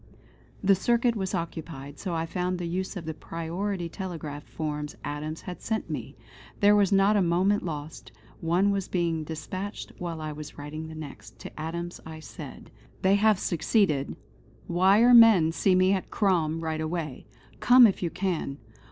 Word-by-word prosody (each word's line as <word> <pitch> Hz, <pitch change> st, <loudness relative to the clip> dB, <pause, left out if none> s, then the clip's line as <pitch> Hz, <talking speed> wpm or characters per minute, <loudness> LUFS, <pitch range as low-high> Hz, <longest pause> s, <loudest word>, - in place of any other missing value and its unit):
The 195 Hz, +1 st, +6 dB
circuit 235 Hz, +4 st, +2 dB
was 190 Hz, -3 st, -2 dB
occupied, 155 Hz, -4 st, -6 dB
so 180 Hz, -4 st, -3 dB
I 165 Hz, 0 st, -1 dB
found 180 Hz, +2 st, -2 dB
the 175 Hz, -, -4 dB
use 185 Hz, +3 st, -3 dB
of 170 Hz, -, -6 dB
the 160 Hz, -, -3 dB
priority 170 Hz, +4 st, -4 dB
telegraph 160 Hz, -5 st, -6 dB
forms 150 Hz, -1 st, -4 dB
Adams 150 Hz, +2 st, -4 dB
had 180 Hz, -1 st, -8 dB
sent 220 Hz, -1 st, -2 dB
me. -, -, -5 dB, 0.4 s
There 205 Hz, +1 st, +6 dB
was 205 Hz, -2 st, +3 dB
not 195 Hz, +2 st, +4 dB
a -, -, +3 dB
moment 185 Hz, +4 st, +2 dB
lost; 155 Hz, -5 st, -6 dB, 0.3 s
one 175 Hz, +5 st, +2 dB
was 195 Hz, -1 st, -1 dB
being 170 Hz, -3 st, -1 dB
despatched 185 Hz, +6 st, -6 dB
whilst 170 Hz, -2 st, -4 dB
I 155 Hz, 0 st, -4 dB
was 150 Hz, 0 st, -9 dB
writing 155 Hz, +2 st, -6 dB
the 160 Hz, -, -9 dB
next. 155 Hz, -3 st, -10 dB
To -, -, -9 dB
Adams 170 Hz, +2 st, -5 dB
I 160 Hz, 0 st, -9 dB
said: 130 Hz, -8 st, -10 dB, 0.3 s
"They 190 Hz, +1 st, +5 dB
have 210 Hz, 0 st, +4 dB
succeeded: 170 Hz, -5 st, +1 dB, 0.5 s
Wire 195 Hz, +7 st, +5 dB
men 220 Hz, -9 st, +8 dB
see 185 Hz, +3 st, +2 dB
me 185 Hz, +1 st, +4 dB
at 190 Hz, -, -2 dB
Crom 165 Hz, -6 st, +1 dB
right 160 Hz, -1 st, -2 dB
away. 155 Hz, -4 st, -4 dB, 0.3 s
Come 245 Hz, 0 st, +8 dB
if 200 Hz, -, +2 dB
you 175 Hz, -, 0 dB
can. 170 Hz, -7 st, -2 dB
175 Hz, 170 wpm, -27 LUFS, 155-195 Hz, 0.5 s, men